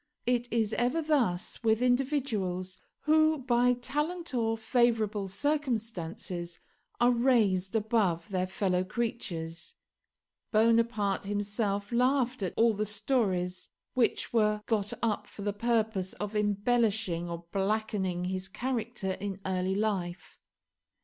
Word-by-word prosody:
It 245 Hz, 0 st, 0 dB
is 225 Hz, -2 st, +1 dB
ever 250 Hz, +6 st, +1 dB
thus 250 Hz, -, 0 dB
with 225 Hz, -1 st, +3 dB
individuals 245 Hz, -9 st, 0 dB, 0.2 s
who 310 Hz, 0 st, +4 dB
by 250 Hz, -2 st, +3 dB
talent 295 Hz, +7 st, -2 dB
or 225 Hz, -2 st, +1 dB
favourable 220 Hz, -3 st, +1 dB
circumstances 200 Hz, -, -2 dB, 0.4 s
are 240 Hz, +1 st, +5 dB
raised 230 Hz, -6 st, +2 dB
above 210 Hz, -5 st, +1 dB
their 185 Hz, -1 st, -1 dB
fellow 185 Hz, -1 st, 0 dB
creatures. 175 Hz, -7 st, -4 dB, 0.8 s
Bonaparte 220 Hz, -3 st, +2 dB
himself 205 Hz, 0 st, -2 dB
laughed 255 Hz, 0 st, +2 dB
at 185 Hz, -, -2 dB
all 230 Hz, 0 st, +5 dB
the 210 Hz, +1 st, -1 dB
stories 200 Hz, -5 st, 0 dB, 0.2 s
which 245 Hz, -1 st, +1 dB
were 210 Hz, -2 st, +2 dB
got 210 Hz, -3 st, 0 dB
up 210 Hz, -2 st, 0 dB
for 200 Hz, -, -9 dB
the 205 Hz, 0 st, -1 dB
purpose 220 Hz, -3 st, 0 dB
of 210 Hz, +1 st, -5 dB
embellishing 205 Hz, -4 st, +1 dB
or 170 Hz, 0 st, -6 dB
blackening 195 Hz, -3 st, -1 dB
his 185 Hz, +1 st, -3 dB
character 235 Hz, -2 st, -3 dB
in 195 Hz, 0 st, -4 dB
early 185 Hz, 0 st, 0 dB
life. 195 Hz, -4 st, -2 dB
215 Hz, 115 wpm, -30 LUFS, 190-240 Hz, 0.8 s, are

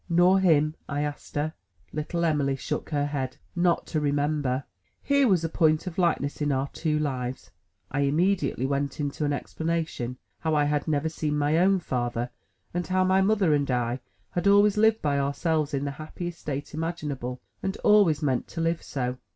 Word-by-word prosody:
"Nor 175 Hz, +3 st, +5 dB
him?" 155 Hz, -5 st, +4 dB, 0.2 s
I 145 Hz, 0 st, -1 dB
asked 145 Hz, -1 st, -6 dB
her. 150 Hz, +2 st, -1 dB, 0.4 s
Little 170 Hz, +3 st, -1 dB
Em'ly 145 Hz, -4 st, +1 dB
shook 130 Hz, -, -4 dB
her 145 Hz, -2 st, 0 dB
head. 135 Hz, -3 st, -3 dB, 0.2 s
"Not 175 Hz, -1 st, +2 dB
to 155 Hz, -, -1 dB
remember!" 145 Hz, -2 st, 0 dB, 0.4 s
Here 280 Hz, -1 st, +4 dB
was 185 Hz, -6 st, +3 dB
a -, -, +1 dB
point 155 Hz, 0 st, +2 dB
Of 180 Hz, -1 st, -5 dB
likeness 155 Hz, -5 st, +1 dB
in 145 Hz, 0 st, +1 dB
our 135 Hz, +1 st, 0 dB
two 155 Hz, -2 st, -1 dB
lives! 130 Hz, -4 st, -3 dB, 0.4 s
I 145 Hz, -, -1 dB
immediately 155 Hz, 0 st, +1 dB
went 140 Hz, +1 st, -1 dB
into 145 Hz, +1 st, -2 dB
an 145 Hz, -, +1 dB
explanation 160 Hz, -4 st, -2 dB, 0.2 s
how 160 Hz, -1 st, 0 dB
I 150 Hz, -, +4 dB
had 145 Hz, +1 st, 0 dB
never 150 Hz, 0 st, +1 dB
seen 150 Hz, -2 st, -2 dB
my 150 Hz, +2 st, +2 dB
own 190 Hz, +2 st, +4 dB
father, 120 Hz, -3 st, -2 dB, 0.4 s
and 175 Hz, 0 st, -2 dB
how 185 Hz, 0 st, +2 dB
my 190 Hz, +1 st, +4 dB
mother 195 Hz, -5 st, +3 dB
and 145 Hz, -1 st, +1 dB
I 125 Hz, 0 st, 0 dB, 0.3 s
had 175 Hz, +2 st, 0 dB
always 205 Hz, 0 st, +6 dB
lived 220 Hz, +1 st, +3 dB
by 140 Hz, -2 st, +2 dB
ourselves 150 Hz, +2 st, 0 dB
in 140 Hz, -1 st, -1 dB
the 140 Hz, -, -2 dB
happiest 165 Hz, +4 st, -7 dB
state 140 Hz, 0 st, -5 dB
imaginable, 150 Hz, -6 st, -3 dB, 0.2 s
and 190 Hz, -, -2 dB
always 190 Hz, -8 st, +5 dB
meant 130 Hz, -4 st, 0 dB
to 165 Hz, -, -7 dB
live 165 Hz, 0 st, 0 dB
so. 125 Hz, -2 st, -3 dB
150 Hz, 185 wpm, -27 LUFS, 140-170 Hz, 0.4 s, always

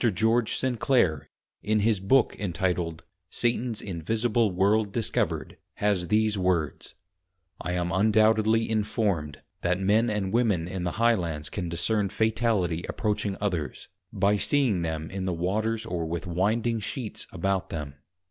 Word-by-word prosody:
George 110 Hz, +3 st, +1 dB
Sinclare, 120 Hz, -, +1 dB, 0.3 s
in 110 Hz, 0 st, +1 dB
his 110 Hz, -1 st, +2 dB
Book 115 Hz, +6 st, +3 dB
Entituled, 85 Hz, -3 st, -2 dB, 0.3 s
Satans 120 Hz, 0 st, -1 dB
Invisible 110 Hz, +5 st, 0 dB
World 100 Hz, +3 st, +2 dB
discovered, 115 Hz, +1 st, -1 dB, 0.2 s
has 100 Hz, -4 st, 0 dB
these 105 Hz, +1 st, +2 dB
Words, 90 Hz, -6 st, -1 dB, 0.7 s
'I 90 Hz, -, -2 dB
am 90 Hz, -1 st, -1 dB
undoubtedly 110 Hz, +2 st, +3 dB
informed, 100 Hz, -9 st, -1 dB, 0.2 s
that 90 Hz, +1 st, +1 dB
men 105 Hz, +5 st, +3 dB
and 105 Hz, -2 st, -2 dB
women 105 Hz, -9 st, +2 dB
in 90 Hz, 0 st, -4 dB
the 90 Hz, -, -1 dB
High 115 Hz, +2 st, +4 dB
lands 80 Hz, -7 st, -3 dB
can 90 Hz, -4 st, -3 dB
discern 100 Hz, +5 st, 0 dB
Fatality 110 Hz, -7 st, 0 dB
approaching 105 Hz, -3 st, -1 dB
others, 90 Hz, -9 st, -3 dB, 0.2 s
by 100 Hz, 0 st, +2 dB
seeing 120 Hz, -6 st, +1 dB
them 80 Hz, -1 st, -3 dB
in 95 Hz, -1 st, -3 dB
the 90 Hz, -, 0 dB
Waters 110 Hz, +6 st, -1 dB
or 85 Hz, -6 st, -3 dB
with 85 Hz, +3 st, -4 dB
Winding 110 Hz, +6 st, 0 dB
Sheets 110 Hz, +2 st, -5 dB
about 95 Hz, +2 st, -1 dB
them. 75 Hz, -3 st, -5 dB
100 Hz, 140 wpm, -27 LUFS, 90-110 Hz, 0.7 s, High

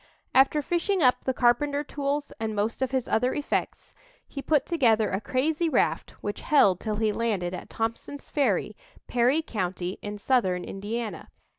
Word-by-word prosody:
After 275 Hz, +3 st, +4 dB
fishing 350 Hz, +3 st, 0 dB
up 250 Hz, -1 st, +3 dB
the 260 Hz, -, +2 dB
carpenter 280 Hz, +4 st, +2 dB
tools 285 Hz, 0 st, -3 dB
and 220 Hz, -1 st, -2 dB
most 210 Hz, +5 st, -1 dB
of 265 Hz, -, +1 dB
his 260 Hz, -1 st, -1 dB
other 250 Hz, +3 st, +1 dB
effects, 290 Hz, -, -3 dB, 0.3 s
he 275 Hz, -, -6 dB
put 300 Hz, 0 st, +2 dB
together 230 Hz, -10 st, +2 dB
a 190 Hz, -, -1 dB
crazy 305 Hz, +8 st, 0 dB
raft -, -, +1 dB
which 205 Hz, -, -4 dB
held 200 Hz, -, +4 dB
till 215 Hz, -1 st, -3 dB
he 215 Hz, 0 st, +1 dB
landed 205 Hz, -5 st, -1 dB
at 180 Hz, -, -7 dB
Thompson's 230 Hz, +5 st, -4 dB
Ferry, 215 Hz, -7 st, 0 dB, 0.3 s
Perry 250 Hz, +6 st, +2 dB
County, 185 Hz, -, -3 dB
in 210 Hz, 0 st, -5 dB
Southern 200 Hz, -6 st, +1 dB
Indiana. 215 Hz, +3 st, -5 dB
240 Hz, 160 wpm, -26 LUFS, 210-285 Hz, 0.3 s, After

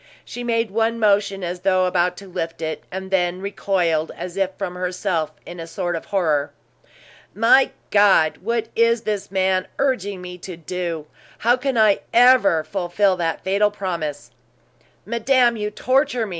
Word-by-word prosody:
She 245 Hz, -, -7 dB
made 230 Hz, -3 st, 0 dB
one 225 Hz, +2 st, 0 dB
motion 200 Hz, -3 st, +1 dB
as 175 Hz, +1 st, -4 dB
though 185 Hz, 0 st, +2 dB
about 180 Hz, 0 st, +1 dB
to 200 Hz, -, -11 dB
lift 165 Hz, -2 st, -5 dB
it, 155 Hz, 0 st, -4 dB
and 190 Hz, +1 st, -6 dB
then 180 Hz, -1 st, +1 dB
recoiled, 180 Hz, -5 st, -1 dB
as 180 Hz, 0 st, -6 dB
if 195 Hz, -1 st, +1 dB
from 190 Hz, -3 st, -4 dB
herself, 180 Hz, -3 st, -2 dB
in 175 Hz, -, -9 dB
a 165 Hz, -, -6 dB
sort 175 Hz, 0 st, -3 dB
of 165 Hz, -, -6 dB
horror. 150 Hz, -7 st, 0 dB, 0.8 s
"My 230 Hz, +5 st, +5 dB, 0.2 s
God! 200 Hz, -6 st, +4 dB
What 225 Hz, +2 st, -2 dB
is 230 Hz, 0 st, +3 dB
this 210 Hz, -2 st, -3 dB
man 190 Hz, -1 st, +1 dB
urging 205 Hz, -8 st, -1 dB
me 180 Hz, 0 st, -9 dB
to 180 Hz, -1 st, -8 dB
do? 170 Hz, -1 st, -4 dB, 0.3 s
How 240 Hz, +2 st, +3 dB
can 260 Hz, -1 st, -2 dB
I 215 Hz, -2 st, +4 dB, 0.2 s
ever 240 Hz, -9 st, +5 dB
fulfill 185 Hz, +3 st, 0 dB
that 165 Hz, -2 st, -2 dB
fatal 200 Hz, +2 st, +2 dB
promise?" 170 Hz, -8 st, -5 dB, 0.7 s
"Madame, 235 Hz, +2 st, +2 dB
you 210 Hz, -1 st, -3 dB
torture 255 Hz, +2 st, +1 dB
me!" -, -, -8 dB
190 Hz, 160 wpm, -21 LUFS, 175-220 Hz, 0.8 s, My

